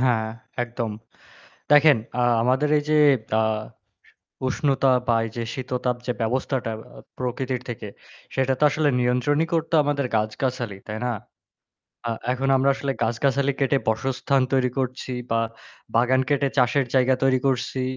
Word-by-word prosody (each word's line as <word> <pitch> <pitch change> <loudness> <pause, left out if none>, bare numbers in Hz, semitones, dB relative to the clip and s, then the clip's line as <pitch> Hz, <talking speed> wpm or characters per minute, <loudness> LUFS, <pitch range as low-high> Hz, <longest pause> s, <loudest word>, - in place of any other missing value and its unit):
হ্যাঁ, 120 -4 +2 0.4
একদম। 115 -2 -4 0.8
দেখেন, 150 -2 +7 0.2
আ - - +2 0.2
আমাদের 130 +5 +2
এই 145 - -1
যে, 155 - +4 0.4
আ - - +3 1.1
উষ্ণতা 135 0 +1 0.2
বা 115 - +3
এই 115 - -5
যে 115 - -1
শীততাপ 125 -1 -2
যে - - +2
ব্যবস্থাটা 125 0 -1 0.3
আ - - -10 0.2
প্রকৃতির 125 0 -2
থেকে 110 -2 -5 0.5
সেটা 130 0 +2
তো - - +2
আসলে 150 0 +1
নিয়ন্ত্রণই 125 +6 +2
করতো 165 0 -1
আমাদের 140 -2 0
গাছগাছালি, 110 0 -2
তাই 105 - -4
না? 125 - 0 1.0
আ - - -1 0.2
এখন 130 +1 -1
আমরা 135 +1 +3
আসলে 135 0 -2
গাছগাছালি 135 +4 +1
কেটে 135 0 +2
বাসস্থান 130 +4 +1
তৈরি 130 -1 +3
করছি 130 0 -3 0.2
বা 115 - +3 0.6
বাগান 125 +2 +3
কেটে 140 -1 +2
চাষের 125 +2 +3
জায়গা 130 0 +4
তৈরি 130 -1 +3
করছি। 130 0 -1
130 Hz, 145 wpm, -24 LUFS, 120-140 Hz, 1.1 s, দেখেন